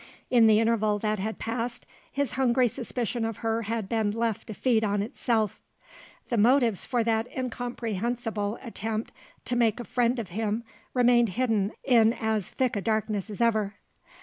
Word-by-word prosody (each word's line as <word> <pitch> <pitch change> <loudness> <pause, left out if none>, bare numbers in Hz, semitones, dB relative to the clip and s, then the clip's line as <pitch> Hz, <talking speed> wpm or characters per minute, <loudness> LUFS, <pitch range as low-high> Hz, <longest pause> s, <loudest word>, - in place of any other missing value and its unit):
In 235 -3 +6
the 215 -1 +6
interval 220 -2 +2
that 215 0 -1
had 220 +3 -3
passed, 235 +1 -3 0.3
his 280 -3 -1
hungry 255 -1 +3
suspicion 240 0 -3
of 225 -2 -2
her 225 0 +1
had 225 -1 -3
been 220 -1 +1
left 225 0 -2
to 215 - -6
feed 230 -2 +2
on 205 -1 +1
itself. 220 -1 -1 0.7
The 235 - 0
motives 235 -2 +4
for 245 -3 +1
that 225 0 +1
incomprehensible 235 -3 -2
attempt 225 -2 -4 0.3
to 245 - -1
make 235 -1 +2
a - - -4
friend 245 +1 +1
of 220 -6 -4
him 215 +4 -2 0.3
remained 240 -2 +4
hidden 220 -1 0
in 230 -3 +5
as 220 -5 -1
thick 255 -3 0
a 205 - -1
darkness 215 0 -1
as 210 +2 -5
ever. 215 -3 +2
225 Hz, 165 wpm, -27 LUFS, 215-240 Hz, 0.7 s, In